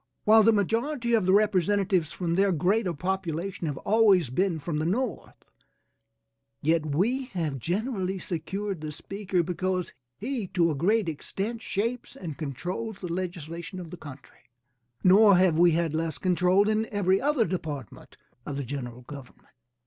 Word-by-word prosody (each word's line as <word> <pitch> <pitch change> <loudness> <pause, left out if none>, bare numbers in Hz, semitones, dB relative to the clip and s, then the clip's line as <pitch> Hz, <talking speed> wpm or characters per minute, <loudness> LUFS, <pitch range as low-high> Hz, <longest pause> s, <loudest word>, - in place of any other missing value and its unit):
While 220 +1 +7
the 225 +1 +6
majority 235 - 0
of 215 -5 +3
the - - +5
representatives, 195 -3 +2
from 170 -2 -2
their 195 +2 +3
greater 185 +4 +1
population, 180 +1 -3
have 145 -3 -3
always 200 - +3
been 180 +4 +1
from 155 0 -3
the 155 - -1
North, 235 +6 -2 1.3
yet 160 +1 +2
we 220 - 0
have 155 -6 -2
generally 190 - -2
secured 190 +1 -4
the 155 -1 -5
speaker 185 +2 -2
because 180 +1 -2 0.2
he 240 -2 -3
to 170 -2 +3
a - - -2
great 200 +7 +2
extent 200 +8 -4
shapes 230 +5 -3
and 165 -6 -6
controls 180 - -4
the 180 -4 -5
legislation 175 0 -5
of 170 -3 -8
the - - -6
country, 145 -7 -13 0.5
nor 200 +1 +7
have 180 -3 +3
we 175 -1 +6
had 165 -1 0
less 160 -1 -2
control 185 +2 +3
in 215 +1 +1
every 195 -2 +1
other 285 -4 +2
department 155 - -6 0.3
of 140 +1 -5
the 140 - -2
general 125 -2 -6
government. 140 -1 -12
185 Hz, 155 wpm, -27 LUFS, 160-205 Hz, 1.3 s, While